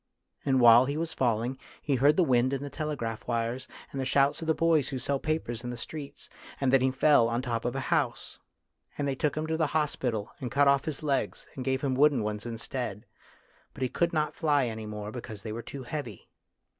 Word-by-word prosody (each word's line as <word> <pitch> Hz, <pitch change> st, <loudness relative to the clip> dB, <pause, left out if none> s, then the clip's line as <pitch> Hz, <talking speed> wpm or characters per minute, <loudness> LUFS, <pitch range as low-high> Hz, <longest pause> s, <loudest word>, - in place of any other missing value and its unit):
And 135 Hz, -2 st, +2 dB
while 120 Hz, +1 st, +8 dB
he 140 Hz, +2 st, -2 dB
was 165 Hz, 0 st, -2 dB
falling, 120 Hz, +1 st, 0 dB, 0.2 s
he 145 Hz, -, -1 dB
heard 140 Hz, +5 st, +4 dB
the 185 Hz, -, +5 dB
wind 130 Hz, -2 st, +2 dB
in 140 Hz, 0 st, -2 dB
the 145 Hz, -, -6 dB
telegraph 120 Hz, -8 st, -4 dB
wires, 120 Hz, +2 st, -2 dB, 0.2 s
and 135 Hz, -, -3 dB
the -, -, -1 dB
shouts 140 Hz, +4 st, +2 dB
of 165 Hz, -, -5 dB
the 160 Hz, -, +3 dB
boys 160 Hz, -5 st, +2 dB
who 135 Hz, -, -3 dB
sell 140 Hz, +2 st, 0 dB
papers 155 Hz, -7 st, -2 dB
in 125 Hz, -, -4 dB
the 120 Hz, -, -5 dB
street, 145 Hz, +3 st, -7 dB, 0.3 s
and 135 Hz, -1 st, +1 dB
then 135 Hz, -, +6 dB
he 130 Hz, -, +3 dB
fell 130 Hz, -2 st, +4 dB
on 115 Hz, +1 st, 0 dB
the -, -, -9 dB
top 115 Hz, -2 st, -2 dB
of 120 Hz, +1 st, -1 dB
a -, -, -1 dB
house. -, -, 0 dB, 0.6 s
And 145 Hz, -, -1 dB
they 140 Hz, -, 0 dB
took 145 Hz, +2 st, -1 dB
him 155 Hz, -, -1 dB
to 160 Hz, 0 st, -1 dB
the 160 Hz, -2 st, +2 dB
hospital, 125 Hz, -8 st, -1 dB
and 125 Hz, -, -4 dB
cut 140 Hz, +4 st, +3 dB
off 140 Hz, 0 st, +4 dB
his 155 Hz, -1 st, -4 dB
legs, 140 Hz, -3 st, -1 dB
and 130 Hz, -, -5 dB
gave 130 Hz, 0 st, 0 dB
hin> 135 Hz, -2 st, 0 dB
wooden 140 Hz, -3 st, +4 dB
ones 105 Hz, +2 st, -3 dB
instead. 115 Hz, -2 st, -4 dB, 0.7 s
But -, -, -3 dB
he 130 Hz, -, 0 dB
could 170 Hz, +5 st, +1 dB
not 155 Hz, -2 st, 0 dB
fly 145 Hz, -4 st, +2 dB
any 110 Hz, -2 st, -5 dB
more 105 Hz, 0 st, -6 dB
because 110 Hz, -4 st, -8 dB
they 110 Hz, -, -5 dB
were 115 Hz, -, -4 dB
too 135 Hz, +2 st, -8 dB
heavy." 120 Hz, -6 st, -6 dB
130 Hz, 230 wpm, -29 LUFS, 120-145 Hz, 0.7 s, while